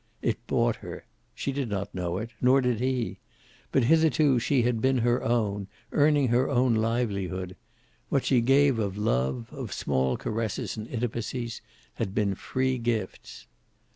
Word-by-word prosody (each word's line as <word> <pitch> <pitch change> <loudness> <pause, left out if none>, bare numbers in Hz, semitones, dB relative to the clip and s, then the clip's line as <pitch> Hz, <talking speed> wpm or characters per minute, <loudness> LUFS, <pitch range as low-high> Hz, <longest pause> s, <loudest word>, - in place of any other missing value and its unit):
It 115 0 -2
bought 120 -1 +1
her. - - -9 0.3
She 140 - -2
did 135 -3 -2
not 100 0 -3
know 90 -1 -2
it, 115 +3 -5
nor 130 +2 +5
did 125 -4 0
he. 125 -2 -1 0.5
But 135 - +3
hitherto 155 -1 +4
she 120 +2 +2
had 120 -2 0
been 130 0 +3
her 120 +1 +1
own, 105 -4 0 0.2
earning 145 -3 +3
her 125 +3 +2
own 125 -2 +3
livelihood. 100 -5 -1 0.5
What 140 - +1
she 125 -3 +4
gave 135 0 +4
of 100 -2 -2
love, 105 - 0
of 130 -7 -6
small 65 0 0
caresses 110 -1 -3
and 110 -1 -6
intimacies, 120 0 -3 0.3
had 95 - -4
been 100 -2 +1
free 130 +6 -1
gifts. 115 -5 -3
120 Hz, 155 wpm, -27 LUFS, 105-130 Hz, 0.5 s, nor